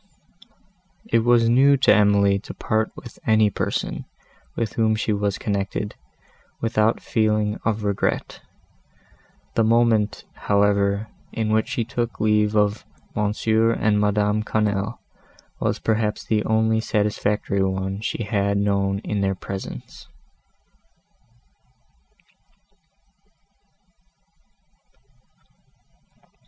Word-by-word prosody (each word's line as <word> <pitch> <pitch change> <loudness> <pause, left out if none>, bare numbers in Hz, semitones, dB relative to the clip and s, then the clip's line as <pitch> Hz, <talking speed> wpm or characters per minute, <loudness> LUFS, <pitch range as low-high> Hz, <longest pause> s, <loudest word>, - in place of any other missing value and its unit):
It 225 - +2
was 120 0 +3
new 135 +4 +5
to 130 - +5
Emily 100 -1 +4
to 105 - -10
part 110 0 0
with 120 - -12
any 110 -1 +4
person, - - -3 0.5
with 115 -3 -2
whom 110 -1 +2
she 110 0 -1
was 100 -1 -1
connected, 100 0 -3 0.7
without 110 0 +1
feeling 105 -1 0
of 110 -1 0
regret; 100 -1 -2 1.1
the 115 - +2
moment, 115 -2 +2
however, 100 +1 +1 0.2
in 110 -1 -2
which 110 0 +2
she 125 -4 -1
took 120 +1 -3
leave 105 0 +2
of 105 0 +1 0.3
M. 105 -1 +1 0.2
and 110 -1 +2
Madame 105 +1 +1
Quesnel, 105 0 -1 0.6
was, - - 0
perhaps, 110 -1 -1
the 105 -1 +1
only 110 0 +2
satisfactory 105 -2 0
one 95 +1 -1
she 115 - -3
had 100 -1 0
known 100 -1 +1
in 105 -1 -2
their 95 0 0
presence. 95 -10 -8
105 Hz, 100 wpm, -23 LUFS, 100-110 Hz, 1.1 s, new